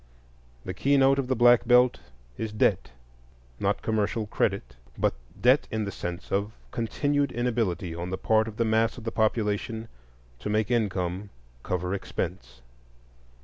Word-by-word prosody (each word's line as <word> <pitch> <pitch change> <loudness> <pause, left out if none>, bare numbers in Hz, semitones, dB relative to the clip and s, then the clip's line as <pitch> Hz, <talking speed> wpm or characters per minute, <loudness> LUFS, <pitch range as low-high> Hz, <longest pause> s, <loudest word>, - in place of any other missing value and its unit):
The 90 - -3
keynote 135 +4 +3
of 135 - -1
the 130 - +1
Black 120 0 +5
Belt 125 0 +5 0.4
is 110 - -4
debt; 105 - +1 0.7
not 100 +1 0
commercial 110 0 0
credit, - - -1 0.2
but - - +2 0.3
debt 130 +4 +4
in 110 -1 -2
the 100 - -4
sense 90 -1 -6
of 100 +2 0 0.2
continued 145 +5 0
inability 115 -8 -1
on 85 +2 -5
the 95 - -2
part 110 +2 +2
of 110 -1 -8
the 115 - +2
mass 110 +1 +2
of 120 - -9
the 115 - -3
population 110 0 -1 0.5
to 105 - -4
make 110 +2 +1
income 100 -4 -1 0.3
cover 90 +4 -2
expense. 60 -10 -5
110 Hz, 145 wpm, -27 LUFS, 95-120 Hz, 0.7 s, Black